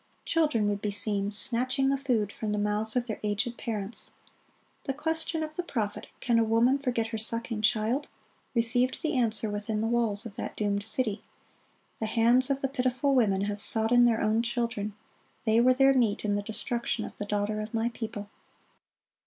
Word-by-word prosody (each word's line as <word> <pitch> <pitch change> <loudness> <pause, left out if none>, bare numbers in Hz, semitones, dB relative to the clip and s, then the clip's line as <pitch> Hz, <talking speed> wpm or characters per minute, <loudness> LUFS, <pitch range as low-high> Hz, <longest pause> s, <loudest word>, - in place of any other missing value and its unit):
Children 300 -10 +2
would 205 -1 -1
be 210 - -1
seen 205 0 +1
snatching 255 +5 +1
the 275 - +2
food 240 -7 0
from 215 0 -4
the - - -1
mouths 210 +2 0
of 245 -1 +1
their 220 -3 -5
aged 215 +3 -1
parents. 215 -2 -4 0.7
The 270 - -2
question 320 +1 0
of 310 0 -6
the 355 - -1
prophet, 225 -12 -3
"Can 235 -1 +2
a - - +4
woman 230 +5 +3
forget 245 -5 -1
her 225 -1 -3
sucking 230 0 -1
child?"(42) 225 +6 +1 0.5
received 245 +2 +2
the 310 - 0
answer 225 -3 +1
within 210 +1 -3
the 220 - 0
walls 230 -2 0
of 225 - -9
that - - -5
doomed 205 -1 -1
city, 220 -1 -1 0.8
"The 220 - -1
hands 240 +4 +3
of 275 0 0
the 270 - +1
pitiful 260 +1 0
women 205 -7 +3
have 205 0 -2
sodden 235 +3 +4
their 230 -2 +2
own 215 +1 +2
children: 230 -3 -2 0.5
they 225 +1 +4
were 255 +1 +5
their 270 +1 +5
meat 230 -6 +1
in 205 - +1
the 205 - 0
destruction 225 +1 -2
of - - -9
the 205 - -4
daughter 210 +1 -1
of 215 +1 -6
my 230 0 0
people." 220 -3 -6
230 Hz, 185 wpm, -28 LUFS, 210-250 Hz, 0.8 s, were